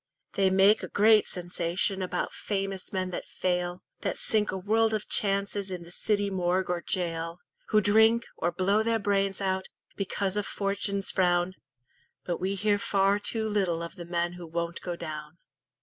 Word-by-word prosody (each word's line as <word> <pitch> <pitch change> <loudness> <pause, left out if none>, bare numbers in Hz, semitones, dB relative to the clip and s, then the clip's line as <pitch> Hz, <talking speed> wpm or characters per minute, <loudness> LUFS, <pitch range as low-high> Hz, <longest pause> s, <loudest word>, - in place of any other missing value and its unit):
They 195 -1 +3
make 195 +3 +5
a - - -5
great 215 +1 +4
sensation 180 +1 -1
About 185 - -2
famous 195 -2 -3
men 185 -1 -2
that - - -5
fail, 180 -1 -2 0.2
That - - -2
sink 215 -1 +2
a 190 - -3
world 220 +3 +2
of 210 - -4
chances 200 0 0
In 180 -2 -5
the 170 - -12
city 205 +2 0
morgue 185 0 0
or 175 -1 -1
gaol, 165 -2 -1 0.3
Who 215 -1 +4
drink, 220 +3 +4
or 175 - -1
blow 190 +5 +2
their 230 +1 +1
brains 200 -2 0
out, 190 -1 -1 0.3
Because 195 0 -1
of 205 - -1
"Fortune's 200 0 0
frown". 175 0 +2 0.7
But 175 - -2
we 190 +2 -1
hear 205 +1 +1
far 200 0 +2
too 220 +1 +1
little 185 -6 0
Of 170 - -7
the 175 -3 -8
men 170 0 -1
who 175 -1 -9
won't 170 +1 -3
go 175 -1 -4
down. 155 -1 -7
190 Hz, 175 wpm, -28 LUFS, 175-205 Hz, 0.7 s, make